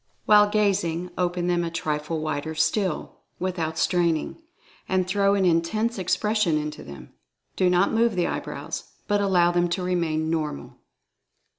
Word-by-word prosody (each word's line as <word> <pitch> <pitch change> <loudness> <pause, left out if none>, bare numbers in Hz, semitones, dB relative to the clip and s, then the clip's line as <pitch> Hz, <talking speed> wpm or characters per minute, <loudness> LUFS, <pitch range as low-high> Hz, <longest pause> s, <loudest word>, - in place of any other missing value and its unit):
While 210 -1 +6
gazing 180 -5 0
open 175 -1 -1
them 175 -1 +1
a 170 - -2
trifle 155 -1 -3
wider 155 0 -3
still, 180 +3 -1 0.2
without 170 -3 -3
straining, 170 - 0 0.5
and 185 -1 +1
throw 200 +1 +2
an 195 -2 +2
intense 195 +7 +1
expression 195 -2 +1
into 150 0 -4
them. 70 0 -11 0.4
Do 185 - +2
not 180 +2 +2
move 230 -1 +2
the 180 - +1
eyebrows, - - -5
but 205 -1 +2
allow 180 -3 +3
them 175 0 +1
to 180 +2 -2
remain 160 -3 -1
normal. 155 - -4
175 Hz, 145 wpm, -25 LUFS, 160-195 Hz, 0.5 s, While